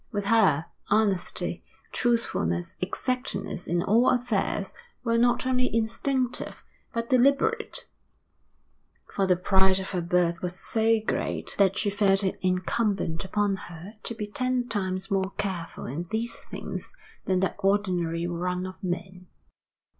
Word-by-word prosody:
With 205 -3 -2
her, 195 -9 +4 0.2
honesty, 205 -3 +1 0.3
truthfulness, 85 - 0
exactness 250 -1 -2
in 170 +1 +1
all 230 +6 +4
affairs, 245 -1 0 0.3
were 230 -1 +2
not 240 +1 +3
only 255 -1 +2
instinctive, 235 +3 -1 0.3
but 230 +1 -3
deliberate; 280 - +2 1.2
for 195 -1 0
the 180 - +5
pride 190 +1 +4
of 190 - -5
her 180 -2 -1
birth 170 0 +1
was 180 +1 -2
so 225 +2 +2
great - - -1
that 195 -1 +4
she 205 - +1
felt 200 -1 +3
it 190 - -1
incumbent 185 -1 0
upon 205 +1 +1
her 175 +5 -9
to 230 - -4
be 215 -1 -3
ten 250 +3 -1
times 190 -4 -2
more 190 0 0
careful 190 -5 -3
in 140 +7 -3
these 230 +1 -1
things - - -6 0.3
than 185 -2 +2
the 190 - 0
ordinary 180 -4 +1
run 180 +1 -2
of 185 +1 -9
men. 180 0 -4
195 Hz, 135 wpm, -27 LUFS, 180-230 Hz, 1.2 s, the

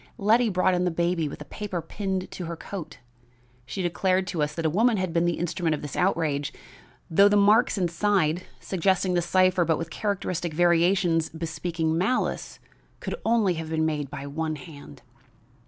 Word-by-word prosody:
Letty 225 +2 +3
brought 185 -1 +2
in 180 0 +1
the 180 - +2
baby 170 -2 0
with 140 - -9
a - - -25
paper 200 -2 -5
pinned 190 +1 -4
to 180 - -6
her 170 +1 -5
coat. 185 0 -8 0.7
She 190 - -4
declared 185 +2 +1
to 165 - -2
us 150 0 0
that 165 - -3
a - - +5
woman 225 +5 +3
had 185 -3 -2
been 170 0 +2
the 175 -1 0
instrument 170 -1 -1
of 150 - -9
this 145 - -6
outrage, 160 -6 0 0.6
though 195 +5 +5
the 205 - +3
marks 210 +3 +4
inside, 175 -2 +1 0.2
suggesting 185 0 0
the 175 - +2
cipher 185 +1 +3
but 160 -2 +1
with 165 0 -5
characteristic 185 -6 -2
variations 175 0 +3
bespeaking 160 0 -2
malice, 210 +8 -1 0.4
could - - -4
only 220 -5 +3
have 160 -1 -5
been 160 0 0
made 150 -3 -2
by 140 -1 -7
one 155 +2 -3
hand. 145 - -12
175 Hz, 180 wpm, -26 LUFS, 160-190 Hz, 0.7 s, a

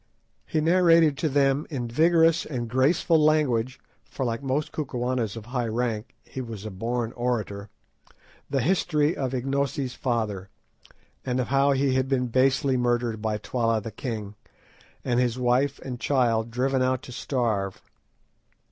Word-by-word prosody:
He 155 - 0
narrated 165 -2 +5
to 160 - +1
them 140 +1 +2
in 130 -6 -3
vigorous 165 +5 +3
and 120 -5 -4
graceful 150 +6 +3
language—for, 130 -3 -1
like 115 -1 -2
most 140 +2 -1
Kukuanas 125 -6 -2
of 110 - -8
high 120 -1 -2
rank, 115 -1 -2
he 130 - -7
was 110 -4 -7
a 110 - -5
born 115 +4 -2
orator—the 120 +3 -5
history 155 -1 +1
of 130 -1 -2
Ignosi's 135 0 -1
father, 105 -6 -2 0.7
and 125 -1 -1
of 125 - -2
how 140 +1 +3
he 135 0 +1
had 130 0 +1
been 125 -2 0
basely 130 +2 +2
murdered 120 -2 0
by 110 -1 -1
Twala 115 +1 0
the 110 +1 -7
king, 105 -2 -5 0.7
and 120 -1 +1
his 125 -1 +1
wife 130 +3 +1
and 125 -2 -5
child 120 -5 +1
driven 130 +3 0
out 130 0 0
to - - -10
starve. 115 -7 -2
125 Hz, 145 wpm, -26 LUFS, 115-140 Hz, 0.7 s, narrated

